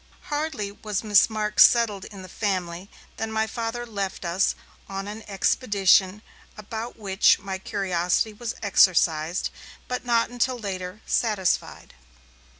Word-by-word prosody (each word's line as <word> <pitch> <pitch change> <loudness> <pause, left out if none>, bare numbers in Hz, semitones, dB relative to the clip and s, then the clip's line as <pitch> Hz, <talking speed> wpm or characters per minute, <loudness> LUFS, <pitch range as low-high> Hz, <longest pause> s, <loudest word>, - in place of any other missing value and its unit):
Hardly 290 -9 -2
was 210 0 -4
Miss 210 -1 +5
Marks 210 -1 0
settled 220 -5 +3
in 195 -3 -10
the - - -9
family, 185 -2 -3 0.3
than 225 0 -3
my 220 0 +1
Father 230 +2 -4
left 200 -5 -4
us 175 +3 +1 0.3
on 195 0 -5
an 210 +2 -7
expedition 200 -1 +2 0.3
about 220 +3 -6
which 195 -2 +3
my 190 -1 -6
curiosity 190 +1 -1
was 235 +2 -5
exercised, 175 -4 +3 0.4
but 250 - -3
not 235 -1 +1
until 245 +1 0
later, 190 -2 -6
satisfied. 210 -6 -1
205 Hz, 130 wpm, -25 LUFS, 190-225 Hz, 0.4 s, Miss